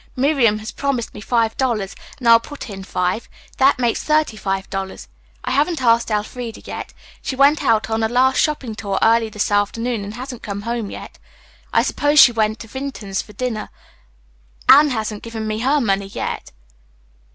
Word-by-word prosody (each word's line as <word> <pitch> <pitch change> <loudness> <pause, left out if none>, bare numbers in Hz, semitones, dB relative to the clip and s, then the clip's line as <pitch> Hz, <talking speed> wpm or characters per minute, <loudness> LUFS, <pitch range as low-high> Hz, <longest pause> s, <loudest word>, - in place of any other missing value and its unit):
Miriam 255 -5 +3
has 215 +1 -7
promised 275 -5 -2
me 210 - -9
five 225 0 +1
dollars 225 -7 -1 0.2
and 245 - -4
I - - +8
will 230 - +8
put 275 -2 -9
in 195 -1 -7
five. 180 +3 -2 0.3
That 270 +1 +4
makes 240 -2 0
thirty 305 -6 +2
five 195 -1 -3
dollars. 195 -1 -5 0.4
I - - -3
haven't 310 +4 +1
asked 230 -2 +3
Elfreda 225 +2 -3
yet. - - -6 0.3
She 265 - -3
went 280 +3 +4
out 225 -5 +2
on 220 0 -1
a 220 - +1
last 255 +2 +3
shopping 285 -7 0
tour 200 -2 -3
early 225 0 +4
this 210 -1 -2
afternoon 220 +2 0
and 205 +2 -7
hasn't 250 0 -7
come 200 -1 -5
home 230 -2 -3
yet. - - -9 0.5
I - - +3
suppose 290 +1 +2
she 245 - +9
went 215 -1 0
to 225 - -9
Vinton's 230 -6 -4
for 210 - -15
dinner. 240 -3 -3 1.0
Anne 295 +2 +8
hasn't 215 -4 -3
given 230 -1 -6
me 215 0 -2
her 275 +5 +2
money 200 -5 0
yet." 195 - -5
230 Hz, 185 wpm, -20 LUFS, 210-260 Hz, 1.0 s, she